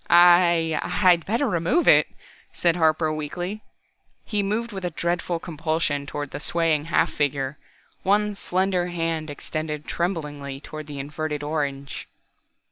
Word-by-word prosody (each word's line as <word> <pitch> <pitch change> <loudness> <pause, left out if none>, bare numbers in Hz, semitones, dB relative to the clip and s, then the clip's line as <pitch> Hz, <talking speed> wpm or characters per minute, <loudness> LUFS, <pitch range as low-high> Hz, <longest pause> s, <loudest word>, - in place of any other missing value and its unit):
"I 175 -2 +6
I'd 175 -4 +3
better 235 +7 +1
remove 180 - +1
it," - - +7 0.5
said 170 -2 +2
Harper 160 -1 +2
weakly. 175 +7 -4 0.6
He 210 -2 0
moved 220 +4 -1
with 190 -2 -6
a 180 - 0
dreadful 170 +1 -1
compulsion 155 -3 -1
toward 145 -1 -5
the - - -5
swaying 160 -2 +1
half 170 - +1
figure, 140 -1 -1 0.4
one 210 +1 +2
slender 185 -1 0
hand 165 -3 -2
extended 150 +1 -4
tremblingly 150 -6 -3
toward 155 +1 -8
the 145 -1 -7
inverted 150 +1 -4
orange. 140 -2 -3
165 Hz, 130 wpm, -24 LUFS, 150-180 Hz, 0.6 s, it